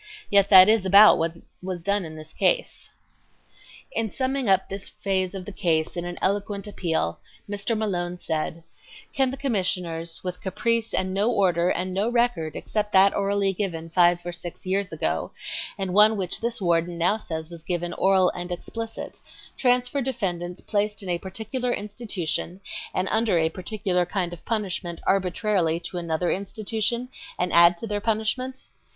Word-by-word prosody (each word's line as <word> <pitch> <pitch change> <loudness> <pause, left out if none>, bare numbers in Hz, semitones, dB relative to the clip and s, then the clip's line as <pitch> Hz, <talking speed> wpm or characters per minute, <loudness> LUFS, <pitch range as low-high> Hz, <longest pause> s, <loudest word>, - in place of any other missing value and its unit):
Yet 200 -1 +5
that 190 -1 +10
is 220 -2 +4
about 200 +3 +7
what 165 +1 -1 0.2
was 180 -2 -5
done 200 0 0
in 160 -1 -8
this 155 0 -11
case." - - 0 1.0
In 225 -1 -1
summing 260 0 -1
up 190 - +3
this 195 0 -6
phase 190 -1 -2
of 185 -2 -6
the 205 - -7
case 160 -4 0
in 175 0 -3
an 175 0 -5
eloquent 200 +1 -1
appeal, 165 - -2 0.3
Mr. 205 +2 -2
Malone 180 -5 -2
said: 160 0 -3 0.5
"Can 265 -1 +2
the 265 - -5
Commissioners, 180 - -2
with 180 -1 -5
caprice 230 +4 -1
and 185 0 0
no 205 +4 +2
order 180 -6 +2
and 185 +1 -1
no 200 +4 +1
record 235 -10 0
except 210 -1 -2
that 195 +1 +6
orally 200 0 +1
given 165 -4 -4
five 175 0 +3
or 175 - -3
six 175 +1 -8
years 195 +1 -1
ago, - - -2 0.4
and 190 -2 -2
one 210 +2 +6
which 185 -3 -3
this 235 0 -2
warden 170 -2 +1
now 175 +6 +2
says 160 -5 -6
was 170 -1 -10
given 175 0 -3
'oral 190 -1 +3
and 175 0 -6
explicit,' 225 +5 -6 0.4
transfer 250 +2 +2
defendants 180 -9 -3
placed 210 0 -1
in 190 - -6
a 175 -1 0
particular 220 +7 -3
institution, 205 -5 -3 0.3
and 185 - -1
under 220 -4 +2
a 160 -1 +2
particular 185 0 -1
kind 180 -3 -2
of 175 - -11
punishment 190 -6 -3
arbitrarily 185 -3 +1
to 175 +1 -4
another 170 0 -1
institution, 220 +4 -2 0.3
and 180 0 -1
add 170 +1 +7
to 230 - -3
their 205 -2 -2
punishment? 230 +4 -1
190 Hz, 165 wpm, -25 LUFS, 175-215 Hz, 1.0 s, that